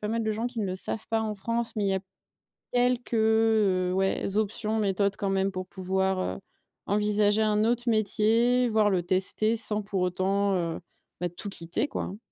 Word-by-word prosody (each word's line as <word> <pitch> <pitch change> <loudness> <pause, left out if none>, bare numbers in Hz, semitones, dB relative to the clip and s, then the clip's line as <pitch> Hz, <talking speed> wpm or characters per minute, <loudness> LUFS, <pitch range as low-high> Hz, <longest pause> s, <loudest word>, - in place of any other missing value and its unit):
pas 210 - -3
mal 225 0 -1
de 215 - 0
gens 225 +3 -2
qui 245 -2 -9
ne 205 - 0
le 185 - -3
savent 210 +3 -3
pas 225 0 +1
en 215 -1 -2
France, 230 +4 -2
mais 210 - 0
il 195 - +1
y 190 - +1
a 190 - -1 0.7
quelques, 245 0 +1
heu, 220 -5 +3
ouais, 190 +1 0
options, 215 +1 0
méthodes 200 -1 +1
quand 200 -2 -2
même 195 0 +1
pour 185 -1 -5
pouvoir, 190 0 -1
heu, - - -3 0.5
envisager 210 +1 +2
un 215 0 +2
autre 240 +1 +1
métier, 230 +3 +3
voir 215 -1 +3
le 185 -3 +1
tester 190 +5 +1
sans 215 -1 0
pour 200 -2 -2
autant, 190 +2 +1
heu, 170 -2 -2 0.4
ben 175 - 0
tout 190 +4 -7
quitter, 180 - -2
quoi - - -4
hein. 195 - -6
210 Hz, 200 wpm, -27 LUFS, 190-220 Hz, 0.7 s, heu